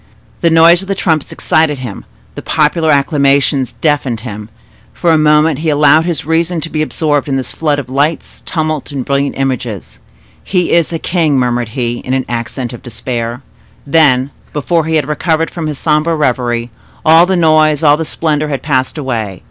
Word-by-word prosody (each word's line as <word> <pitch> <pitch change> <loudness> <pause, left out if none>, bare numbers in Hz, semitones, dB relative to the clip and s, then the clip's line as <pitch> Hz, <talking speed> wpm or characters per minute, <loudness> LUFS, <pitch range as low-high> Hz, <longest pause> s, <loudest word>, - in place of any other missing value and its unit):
The 170 - +2
noise 165 +2 +5
of 195 - -10
the 195 - -1
trumpets 160 -5 -1
excited 155 -4 +1
him—the 105 - -10
popular 160 +1 +1
acclamations 140 -2 +2
deafened 140 -7 -1
him: 105 -3 -8 0.5
for 170 - +1
a 160 - +4
moment 150 -1 +3
he 160 0 -1
allowed 150 +2 +4
his 170 -6 -2
reason 165 +2 0
to 165 - -5
be 155 - -1
absorbed 150 -2 0
in 135 - 0
this 130 -2 -3
flood 150 -3 -1
of 140 -4 -5
lights, 145 +5 -2
tumult, 155 -3 -3
and 135 -3 -4
brilliant 140 0 -1
images. 125 - -4 0.4
"He 180 -2 0
is 170 -1 +2
a 165 - -2
king!" 160 -4 0
murmured 120 -2 0
he, 120 -1 -1
in 130 - -3
an 130 - -1
accent 120 +1 -4
of 120 - -9
despair. 120 +1 -5 0.4
Then, 140 -3 +3 0.2
before 160 +2 0
he 160 0 -1
had 150 -3 +1
recovered 160 +1 -1
from 165 -3 -4
his 150 -2 -4
sombre 155 +2 +1
reverie, 120 -5 -1 0.3
all 165 +2 +6
the 190 -1 +1
noise, 155 -2 +3
all 145 -1 +6
the 160 - -3
splendor, 155 -1 -1
had 140 -3 -4
passed 130 -1 -1
away. 115 - -3
150 Hz, 180 wpm, -13 LUFS, 130-160 Hz, 0.5 s, all